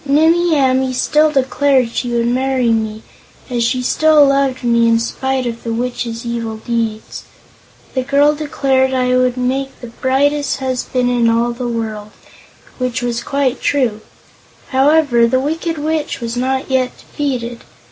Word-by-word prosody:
"Nimmie 320 Hz, +3 st, +3 dB
Amee 260 Hz, -1 st, +2 dB
still 300 Hz, +4 st, +2 dB
declared 270 Hz, -2 st, +2 dB
she 245 Hz, -, -2 dB
would 235 Hz, -1 st, 0 dB
marry 255 Hz, 0 st, +1 dB
me, 220 Hz, -1 st, -2 dB, 0.5 s
as 240 Hz, -1 st, 0 dB
she 250 Hz, +2 st, 0 dB
still 310 Hz, +3 st, +4 dB
loved 275 Hz, -2 st, +1 dB
me 235 Hz, -1 st, +3 dB
in 230 Hz, 0 st, +4 dB
spite 265 Hz, +2 st, -2 dB
of 235 Hz, -1 st, -4 dB
the 230 Hz, -, -3 dB
Witch's 235 Hz, 0 st, -3 dB
evil 230 Hz, -2 st, -4 dB
deeds. 225 Hz, -1 st, -3 dB, 0.7 s
The 260 Hz, -, 0 dB
girl 280 Hz, +3 st, +3 dB
declared 270 Hz, -3 st, 0 dB
I 250 Hz, 0 st, +1 dB
would 255 Hz, 0 st, +1 dB
make 265 Hz, +2 st, -2 dB
the 240 Hz, -2 st, -10 dB
brightest 285 Hz, +3 st, +1 dB
husband 255 Hz, -1 st, -1 dB
in 235 Hz, -2 st, +2 dB
all 235 Hz, +1 st, +1 dB
the 245 Hz, +1 st, -4 dB
world, 220 Hz, -3 st, -4 dB, 0.7 s
which 250 Hz, -1 st, -2 dB
was 240 Hz, -1 st, -2 dB
quite 275 Hz, -2 st, -1 dB
true. 245 Hz, -7 st, 0 dB, 0.7 s
However, 270 Hz, -3 st, +3 dB
the 260 Hz, +2 st, +1 dB
Wicked 320 Hz, +4 st, -2 dB
Witch 310 Hz, +1 st, -2 dB
was 235 Hz, 0 st, -4 dB
not 265 Hz, +2 st, -2 dB
yet 255 Hz, -1 st, 0 dB
defeated. 245 Hz, -5 st, -4 dB
255 Hz, 150 wpm, -16 LUFS, 235-275 Hz, 0.7 s, still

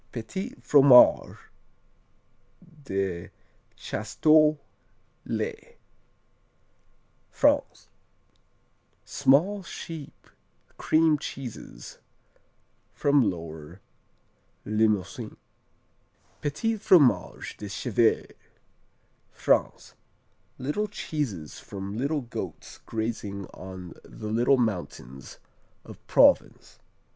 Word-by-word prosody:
Petits 190 Hz, -, -6 dB
Fromages 135 Hz, -4 st, +6 dB, 1.5 s
de 95 Hz, -5 st, -3 dB, 0.5 s
Chasteaux, 155 Hz, -1 st, +2 dB, 0.7 s
les -, -, -4 dB, 1.5 s
France -, -, +1 dB, 1.2 s
Small, 185 Hz, +10 st, +2 dB
sheep 165 Hz, -4 st, -9 dB, 0.5 s
cream 155 Hz, -1 st, +2 dB
cheeses 120 Hz, -, -8 dB, 0.9 s
from 140 Hz, -6 st, +2 dB
Lower 80 Hz, -1 st, -8 dB, 0.9 s
Limousin. 110 Hz, +1 st, -1 dB, 1.0 s
Petits 150 Hz, +11 st, -1 dB
Fromages 160 Hz, -10 st, +3 dB
de 105 Hz, -, -7 dB
Chèvre 115 Hz, +2 st, 0 dB, 1.0 s
France -, -, 0 dB, 0.6 s
Little 150 Hz, +12 st, -2 dB
cheeses 105 Hz, -, -4 dB
from 100 Hz, 0 st, -7 dB
little 140 Hz, +5 st, -1 dB
goats 120 Hz, -, -8 dB
grazing 110 Hz, -3 st, -4 dB
on 90 Hz, -1 st, -9 dB
the 105 Hz, -1 st, -8 dB
little 120 Hz, +4 st, +3 dB
mountains 85 Hz, -, -4 dB, 0.5 s
of -, -, -12 dB
Provence. -, -, +3 dB
120 Hz, 65 wpm, -26 LUFS, 95-150 Hz, 1.5 s, Fromages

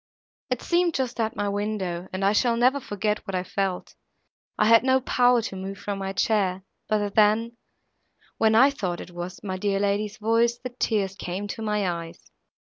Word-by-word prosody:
It 255 Hz, -2 st, -2 dB
seemed 345 Hz, -1 st, +1 dB
just 255 Hz, -2 st, -2 dB
at 220 Hz, -1 st, -1 dB
my 205 Hz, -, -1 dB
window, 200 Hz, -4 st, -2 dB
and 190 Hz, +1 st, -2 dB
I 200 Hz, -, +4 dB
shall 230 Hz, +2 st, +2 dB
never 255 Hz, +4 st, +3 dB
forget 210 Hz, -4 st, -2 dB
what 195 Hz, -, -3 dB
I 180 Hz, -, -1 dB
felt. 190 Hz, 0 st, -3 dB, 0.6 s
I 210 Hz, -, +3 dB
had 230 Hz, +1 st, +6 dB
not 260 Hz, 0 st, +2 dB
power 245 Hz, -1 st, +3 dB
to 195 Hz, -, -5 dB
move 190 Hz, +1 st, -6 dB
from 200 Hz, 0 st, -4 dB
my 195 Hz, 0 st, -3 dB
chair, 195 Hz, -2 st, 0 dB, 0.3 s
but 205 Hz, -2 st, 0 dB
then, 220 Hz, +2 st, +3 dB, 0.8 s
when 220 Hz, 0 st, +4 dB
I 265 Hz, +5 st, +6 dB
thought 185 Hz, -10 st, -3 dB
it -, -, -9 dB
was 175 Hz, +1 st, -7 dB
my 190 Hz, -2 st, -3 dB
dear 195 Hz, 0 st, 0 dB
lady's 205 Hz, +1 st, -1 dB
voice, 230 Hz, +2 st, +2 dB
the 250 Hz, -, -6 dB
tears 210 Hz, -5 st, -1 dB
came 195 Hz, +1 st, -5 dB
to 225 Hz, -, -5 dB
my 210 Hz, -2 st, 0 dB
eyes. 170 Hz, -1 st, -6 dB
210 Hz, 190 wpm, -25 LUFS, 195-230 Hz, 0.8 s, had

